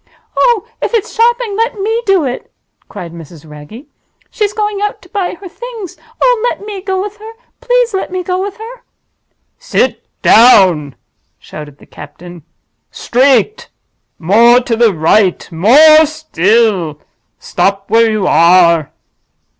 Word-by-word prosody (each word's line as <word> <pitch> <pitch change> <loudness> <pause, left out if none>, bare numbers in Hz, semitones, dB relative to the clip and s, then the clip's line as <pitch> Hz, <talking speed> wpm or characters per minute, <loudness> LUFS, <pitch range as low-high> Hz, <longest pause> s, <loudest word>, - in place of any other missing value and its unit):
"Oh, 465 -3 +1
if - - -2
it's 440 - -3
shopping, 470 -2 0
let 455 +1 -2
me 445 +4 -1
do 385 -4 +2
it!" 250 -1 -6 0.4
cried 170 -2 -9
Mrs. 165 -1 -13
Wragge. 150 - -12 0.5
"She's 420 -3 -2
going 420 -1 -3
out 415 0 -3
to - - -19
buy 390 -5 -3
her 380 +2 -12
Things! 455 -2 -9 0.2
Oh, - - +1
let 410 - -7
me 410 -2 -7
go 380 0 -3
with 415 +2 -6
her—please 475 +2 -3
let 380 -1 -4
me 370 0 -4
go 365 0 -3
with 400 0 -6
her!" 465 +3 -11 0.8
"Sit - - -1 0.2
down!" 185 - +4 0.4
shouted 145 -2 -11
the - - -19
captain. 170 +4 -13 0.5
"Straight! 265 - 0 0.5
more 230 +8 +4
to 240 -2 -2
the 230 -1 +3
right—more 215 - +3
still. 215 - 0 0.4
Stop 195 0 -2
where 230 0 +3
you 215 -3 -2
are!" 170 -2 +3
290 Hz, 135 wpm, -13 LUFS, -, 0.8 s, down